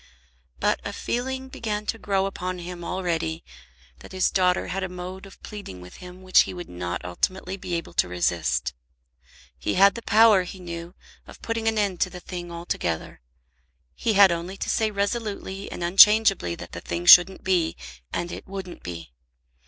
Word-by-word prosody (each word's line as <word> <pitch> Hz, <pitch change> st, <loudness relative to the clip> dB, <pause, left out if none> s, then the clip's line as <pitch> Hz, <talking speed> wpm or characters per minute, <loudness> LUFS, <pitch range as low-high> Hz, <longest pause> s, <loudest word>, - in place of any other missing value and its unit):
But -, -, +1 dB
a -, -, -5 dB
feeling 260 Hz, +2 st, -3 dB
began 215 Hz, -5 st, -4 dB
to 225 Hz, -, -3 dB
grow 195 Hz, -2 st, 0 dB
upon 185 Hz, -2 st, -4 dB
him 175 Hz, 0 st, -7 dB
already 165 Hz, -3 st, -2 dB, 0.6 s
that -, -, -13 dB
his 185 Hz, -1 st, +1 dB
daughter 180 Hz, -1 st, +1 dB
had 195 Hz, +2 st, -2 dB
a 190 Hz, -, -3 dB
mode 180 Hz, +2 st, -8 dB
of 195 Hz, -, -16 dB
pleading 200 Hz, -, -8 dB
with 90 Hz, 0 st, -12 dB
him 180 Hz, +1 st, -12 dB
which 185 Hz, 0 st, +5 dB
he -, -, -6 dB
would 175 Hz, -1 st, -8 dB
not 90 Hz, 0 st, -5 dB
ultimately 185 Hz, -, -2 dB
be 180 Hz, -2 st, -4 dB
able 165 Hz, -, -5 dB
to -, -, +2 dB
resist. 85 Hz, -7 st, -1 dB, 0.9 s
He -, -, -1 dB
had 200 Hz, +2 st, +6 dB
the 235 Hz, -, -7 dB
power, 220 Hz, -3 st, +5 dB
he 180 Hz, +1 st, -8 dB
knew, 170 Hz, 0 st, -7 dB, 0.3 s
of -, -, -14 dB
putting 230 Hz, -1 st, -2 dB
an 225 Hz, 0 st, +1 dB
end 200 Hz, -4 st, 0 dB
to 185 Hz, -, +2 dB
the 180 Hz, 0 st, -9 dB
thing 175 Hz, -1 st, -7 dB
altogether. 130 Hz, -, -4 dB, 0.7 s
He 225 Hz, -, -1 dB
had 200 Hz, -2 st, +7 dB
only 170 Hz, +3 st, -4 dB
to -, -, -4 dB
say 220 Hz, -1 st, +1 dB
resolutely 200 Hz, -1 st, -3 dB
and 175 Hz, -, -5 dB
unchangeably 195 Hz, -, +6 dB
that -, -, -10 dB
the -, -, -7 dB
thing 85 Hz, 0 st, -4 dB
shouldn't 180 Hz, -, +8 dB
be, 180 Hz, -4 st, +1 dB, 0.3 s
and 175 Hz, 0 st, -3 dB
it -, -, -8 dB
wouldn't 190 Hz, -2 st, -7 dB
be. 85 Hz, -7 st, -8 dB
185 Hz, 180 wpm, -25 LUFS, 170-200 Hz, 0.9 s, shouldn't